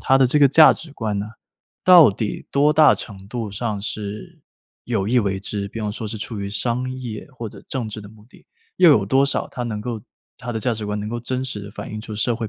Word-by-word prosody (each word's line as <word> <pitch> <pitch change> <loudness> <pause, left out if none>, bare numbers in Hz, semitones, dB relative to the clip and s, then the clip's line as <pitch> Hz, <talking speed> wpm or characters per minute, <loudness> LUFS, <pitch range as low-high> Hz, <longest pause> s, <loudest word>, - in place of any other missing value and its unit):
它 135 - +3
的 135 - +5
这 140 +5 +2
个 140 -2 +6
价 155 +3 +8
值 160 -3 -10
观 110 -6 -3
呢， 100 +1 -4 0.6
到 175 - +8
底 105 +1 -4
多 145 +2 +3
大 155 -1 +6
程 95 -3 -9
度 115 -2 -4
上 105 0 -3
是 105 0 -6 0.4
有 110 -5 -1
意 125 - +3
为 100 -4 0
之？ 100 0 -4
比 115 - -8
方 105 -1 -2
说 110 0 -6
是 110 - -5
出 110 0 -6
于 100 - -4
商 120 +5 -2
业 125 -4 -7
或 115 -2 -5
者 - - -13
政 125 -4 -3
治 110 0 -7
的 105 - -11
目 105 -1 -17
的， - - -20 0.3
又 180 -3 +7
有 110 -9 +4
多 135 +5 +3
少 140 - -2
它 125 - -6
能 110 -3 -3
够 115 +1 -5 0.4
它 120 - -6
的 110 - -2
价 120 +2 0
值 110 -1 -4
观 105 0 -2
能 105 - -4
够 120 +2 -4
真 130 +2 -3
实 115 -6 -5
地 100 0 -9
反 - - -8
映 110 - -5
出 110 -1 -8
社 115 +2 +1
会 110 -2 -4
110 Hz, 275 characters per minute, -21 LUFS, 105-130 Hz, 0.6 s, 价